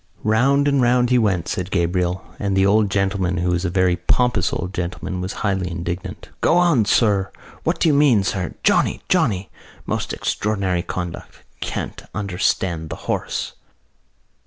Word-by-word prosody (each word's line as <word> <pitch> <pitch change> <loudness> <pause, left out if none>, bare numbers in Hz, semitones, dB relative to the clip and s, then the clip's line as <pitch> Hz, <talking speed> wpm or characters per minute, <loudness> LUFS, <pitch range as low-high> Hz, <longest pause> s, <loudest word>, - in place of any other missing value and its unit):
"Round 135 +7 +3
and 140 -2 +3
round 125 0 +3
he 125 - +5
went," 95 -7 +1
said 90 -3 -3
Gabriel, 90 0 0
"and 100 -2 0
the 95 - +4
old 105 +1 +3
gentleman, 95 -2 0
who 90 +1 0
was 90 +2 0
a - - +1
very 90 0 +2
pompous 115 -6 +1
old 90 +2 -4
gentleman, 90 +1 -4
was 90 +2 -3
highly 95 -3 0
indignant. 85 +1 -5
'Go 170 - +4
on, 170 -11 +4
sir! 100 -2 +2 0.3
What - - 0
do - - +3
you 155 - +4
mean, 140 -8 +4
sir? 95 -2 -2
Johnny! - - +2
Johnny! 95 -2 +1 0.3
Most - - -2
extraordinary 100 -4 -1
conduct! 90 -1 -6 0.2
Can't - - -4
understand 90 -4 -1
the - - -4
horse! - - -2
95 Hz, 160 wpm, -21 LUFS, 90-110 Hz, 0.3 s, he